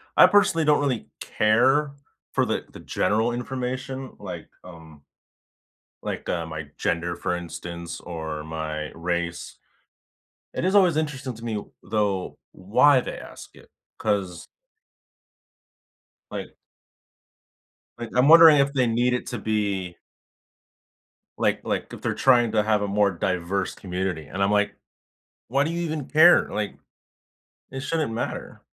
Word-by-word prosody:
I - - +9
personally 190 -5 +3
don't 150 -1 +4
really 135 -5 -1
care 130 +7 +2 0.4
for - - +2
the - - -2
the - - -11
general 110 +3 0
information, 130 +2 -4
like, - - -7 0.2
um, 80 -4 -13 1.0
like, - - -5
uh, 85 -2 -1
my 75 -2 -6
gender, 85 +1 -1
for 90 - -2
instance, 85 0 -7
or 80 -3 -6
my 80 -1 -5
race. 85 0 -3 1.0
It - - -2
is 190 +2 +2
always 180 -6 +5
interesting 140 -4 -3
to 115 - -12
me, 105 -3 -3 0.2
though, 100 -3 -1
why 125 +9 +4
they - - -5
ask - - -12
it, - - -18 0.3
'cause 95 -4 -2 1.9
Like - - -6 1.4
I 120 - -4
I'm 125 +2 +4
wondering 165 -1 +9
if 140 0 +2
they 130 -3 +2
need 120 +2 +1
it 125 - -2
to 125 - -4
be 100 -5 -2 1.4
like - - +1
like - - -3
if - - -9
they're - - -1
trying 120 -4 +4
to 105 -1 +2
have 105 -1 +2
a 105 - -1
more 100 0 +2
diverse 90 +1 -2
community 90 -4 -4
and 95 +6 -3
I'm, 100 - +2
like, 105 0 +1 0.7
"Why 135 +4 +2
do 160 - -2
you 170 +1 -2
even 155 -4 -3
care?" 160 +3 +6
Like, 105 -1 -3 0.9
it 135 - -5
shouldn't 150 -2 -1
matter. 115 - -5
110 Hz, 140 wpm, -24 LUFS, 90-135 Hz, 1.9 s, I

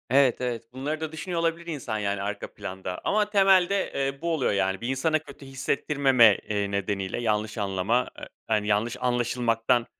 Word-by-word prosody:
Evet, 130 -1 +4
evet. 120 -2 -2
Bunları 145 +4 -3
da 160 -1 -3
düşünüyor 170 +2 -3
olabilir 170 +1 -1
insan 140 -9 -3
yani, 100 -1 -1
arka 100 +1 -4
planda 95 -2 -6
ama 210 0 +1
temelde, 195 -1 +4
eee, 135 0 -2
bu 170 0 0
oluyor 150 -5 +1
yani. 95 -1 0
Bir 120 - -3
insana 145 +5 +1
kötü 140 -2 -13
hissettirmeme, 135 -3 +3
eee, 100 -1 -1
nedeniyle; 100 +1 -2
yanlış 110 -1 -1
anlama, 100 +4 0
eee, - - -7 0.2
hani, 105 -2 +1
yanlış 110 +4 +1
anlaşılmaktan 120 -1 +1
125 Hz, 170 wpm, -26 LUFS, 105-150 Hz, 0.2 s, Evet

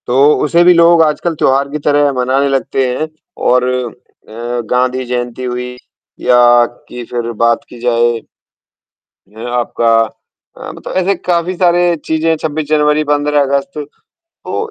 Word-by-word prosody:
तो 120 - -1 0.3
उसे 170 +3 +3
भी 180 +1 +6
लोग 170 0 +5
आजकल 160 +2 -1
त्योहार 140 -1 +1
की 150 - -4
तरह 145 -1 +3
मनाने 130 +2 0
लगते 135 -1 0
हैं 140 +5 -2 0.4
और 125 0 +3 0.7
अ, 120 +2 -4
गांधी 125 +1 0
जयंती 120 0 -4
हुई 125 0 -4 0.4
या 125 -1 +3 0.5
कि 125 - -7
फ़िर 120 -1 -3
बात 115 0 +2
की 120 - -12
जाए 120 -1 +1 1.1
ये 110 +3 -10
आपका 120 -1 0 0.7
अ, - - -8
मतलब - - -9
ऐसे 195 +2 +1
काफ़ी 175 0 -1
सारे 175 -1 +2
चीज़ें 160 +1 0
हैं, 165 - +2
26 155 0 -3
जनवरी, 150 0 +2
15 145 0 +1
अगस्त। 140 +4 -1 0.5
तो 430 +6 -6
140 Hz, 145 wpm, -14 LUFS, 125-160 Hz, 1.1 s, भी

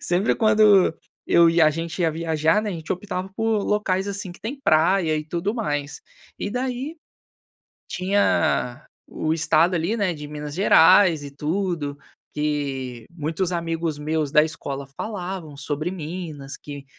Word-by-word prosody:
sempre 180 +5 +1
quando 215 -5 +5 0.3
eu 170 -1 +6
e 165 +1 +2
a 155 -1 +6
gente 165 +3 -4
ia 165 - +3
viajar, 160 +4 +1
né, 210 - -2
a - - -3
gente 160 -2 -4
optava 190 0 -4
por 225 -2 +1
locais, 200 -2 0
assim, 200 -2 -5
que - - -17
têm 270 +5 -5
praia 160 -1 +3
e 150 - -3
tudo 175 +5 -2
mais. 145 - -3 0.4
E 205 - -3
daí, 255 +6 -3 0.9
tinha 180 -8 +1 0.2
o 155 - -2
estado, 165 +2 +3
ali, 170 +7 0
né, 200 -5 +1
de 150 -2 -8
Minas 150 0 -6
Gerais 175 -3 +6
e 140 - -8
tudo, 155 -1 -2 0.4
que 135 -5 -3
muitos 170 +3 -2
amigos 165 -2 -2
meus 155 -1 -1
da 150 - +6
escola 140 -3 -5
falavam 185 -7 -5
sobre 145 +3 -3
Minas, 155 -5 -6
que 145 -1 -9
165 Hz, 150 wpm, -23 LUFS, 150-195 Hz, 0.9 s, eu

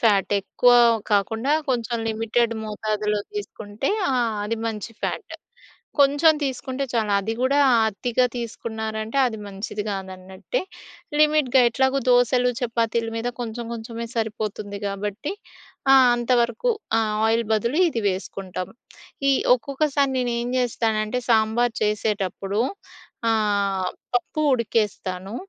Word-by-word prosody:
Fat. 205 -3 +3
ఎక్కువ 245 +5 +3 0.4
కాకుండా 225 +7 +1 0.2
కొంచెం 235 -1 -1
లిమిటెడ్ 225 +1 0
మోతాదులో 210 0 -1
తీసుకుంటే 220 - -5 0.2
ఆ! - - +1 0.3
అది 230 +2 -2
మంచి 220 0 -4
ఫ్యాట్. 370 - -4 0.7
కొంచెం 290 +3 +5
తీసుకుంటే 265 0 -2
చాలు, 220 -3 0
అది 215 +3 -3
గూడా 265 +2 +2 0.3
అతిగా 245 +4 0
తీసుకున్నారంటే, 220 0 -4
అది 225 -3 -4
మంచిది 200 +1 -5
గాదన్నట్టే. 190 - -4 0.6
లిమిట్‌గా 300 -4 +4
ఎట్లాగో 265 +3 +1
దోసలు, 245 0 +4
చపాతీలు 230 -1 0
మీద 235 +2 -2
కొంచెం 235 0 -4
కొంచెమే 230 +1 -6
సరిపోతుంది 215 -2 -3
గాబట్టి. 205 - -4 0.6
ఆ! - - +9 0.2
అంతవరకు 240 - +1 0.3
ఆ - - +3 0.3
ఆయిల్ 225 +1 +2
బదులు 235 - 0
ఇది 230 -8 -3
వేసుకుంటాం. 185 -1 -5 0.6
ఈ - - +5 0.2
ఒక్కొక్కసారి 280 +1 0
నేను 245 -1 0
ఏం 240 - -3
జెస్తానంటే, 225 -1 0
సాంబార్ 225 +1 +3
చేసేటప్పుడు 205 -1 -1 0.7
ఆహ్, 200 -4 +1 0.2
పప్పు 245 +5 -1
ఉడికేస్తాను. 205 -4 -2
225 Hz, 110 wpm, -23 LUFS, 210-245 Hz, 0.7 s, ఆ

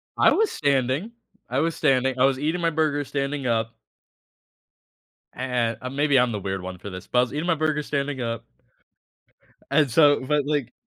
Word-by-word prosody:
I - - +5
was 440 -1 +2
standing 140 - 0 0.4
I 130 - 0
was 165 +2 0
standing 130 -1 +1
I 130 - +6
was 135 -1 +1
eating 160 +4 -1
my 170 - +2
burger 150 -2 0
standing 140 0 -3
up. 115 -1 -1 1.6
And 120 -3 -1
uh, 130 - -4
maybe 140 0 +2
I'm 125 -1 +3
the 105 - -3
weird 95 -1 -4
one 90 0 -7
for 100 - -8
this? 95 -1 -9
But, 125 - +1
I - - +7
was 125 - -2
eating 150 +3 -2
my 175 - +3
burger 155 -1 0
standing 140 -2 -2
up. 115 -1 -4 1.3
And, 145 0 +3
so 145 +3 +5
but, 145 0 +1
like 145 -5 -2
135 Hz, 190 wpm, -24 LUFS, 125-150 Hz, 1.6 s, I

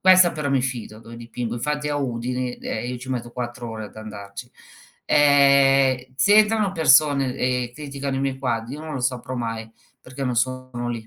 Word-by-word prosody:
questa 185 -2 +6
però 150 -2 -3
mi 135 -1 +2
fido, 120 -4 -5
dove 115 +1 -12
dipingo, 115 0 -5
infatti 150 +5 -2
è - - -1
a 145 - -1
Udine, 125 -1 -3
ehm, 110 +2 -4
io 125 - -4
ci 125 +2 -10
metto 120 -2 -3
4 120 0 -5
ore 110 -1 -6
ad 105 - -13
andarci. 110 +2 -9 0.5
Ehm, 135 -3 +4
se 205 +8 +5
entrano 215 -2 +3
persone, 145 -5 +4
e 125 -1 -1
criticano 140 -2 -5
i - - -1
miei 135 -1 -2
quadri, 120 -1 -2
io 150 - -8
non 155 -1 -6
lo 135 - -3
saprò 125 0 -2
mai 115 -2 -4 0.3
perché 130 +1 -7
non 125 -1 -1
sono 130 0 -2
lì. 115 -2 -5
130 Hz, 195 wpm, -23 LUFS, 120-140 Hz, 0.5 s, questa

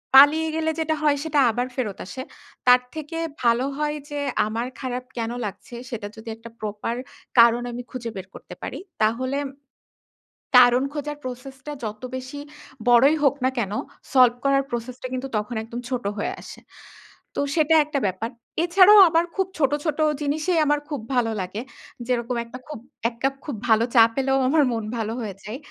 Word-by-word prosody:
পালিয়ে 295 +4 +8
গেলে 320 0 0
যেটা 315 0 0
হয় 295 -1 +3
সেটা 310 -2 +1
আবার 245 +3 -1
ফেরত 215 -7 -2
আসে। 260 +7 -7 0.5
তার 250 0 +8
থেকে 315 +1 -5 0.3
ভালো 235 +2 +3
হয় 300 0 -1
যে, 290 0 -4 0.3
আমার 230 +3 -2
খারাপ 255 -1 -3
কেন 230 0 -2
লাগছে? 210 +4 -8
সেটা 215 -4 -5
যদি 220 +1 -9
একটা 225 +1 -12
proper 215 +2 -3 0.4
কারণ 235 +1 +7
আমি 240 +1 -5
খুঁজে 240 -2 -5
বের 190 -1 -7
করতে - - -11
পারি - - -5 0.2
তাহলে 255 +5 +1 1.2
কারণ 250 +1 +7
খোঁজার 295 0 -4
process 255 +1 -7
টা 295 - -3
যত 215 -1 -5
বেশি 260 +2 -6 0.5
বড়ই 255 +6 +6
হোক 280 -1 +4
না - - +4
কেন 205 -4 -1 0.4
solve 250 -2 +6
করার 275 0 +3
process 240 +1 -4
টা - - -2
কিন্তু 255 +1 -3
তখন 210 +3 -3
একদম 235 +2 -6
ছোট 250 -2 -2
হয়ে 205 - -1
আসে। - - -11 0.8
তো - - -2 0.2
সেটা 320 0 +4
একটা 295 -1 -2
ব্যাপার। 190 +5 -3 0.3
এছাড়াও 375 +4 +7
আবার 330 +1 +3
খুব 385 -1 +1
ছোট, 275 -3 +3
ছোট 310 -1 -1 0.2
জিনিসেই 310 +4 +1
আমার 295 0 +2
খুব 290 -6 -3
ভালো 230 -2 +2
লাগে। 185 +4 -4 0.5
যেরকম 245 0 -1
একটা 235 +2 -9
খুব 300 -5 -7 0.3
এক 235 - -17
কাপ 270 0 +2
খুব 285 - -4
ভালো 220 +1 +5
চা 230 - +9
পেলেও 270 0 +1
আমার 300 +3 +4
মন 225 -1 -2
ভালো 220 0 -2
হয়ে 205 -4 -5
যায় 215 +5 -6
255 Hz, 175 wpm, -24 LUFS, 230-290 Hz, 1.2 s, চা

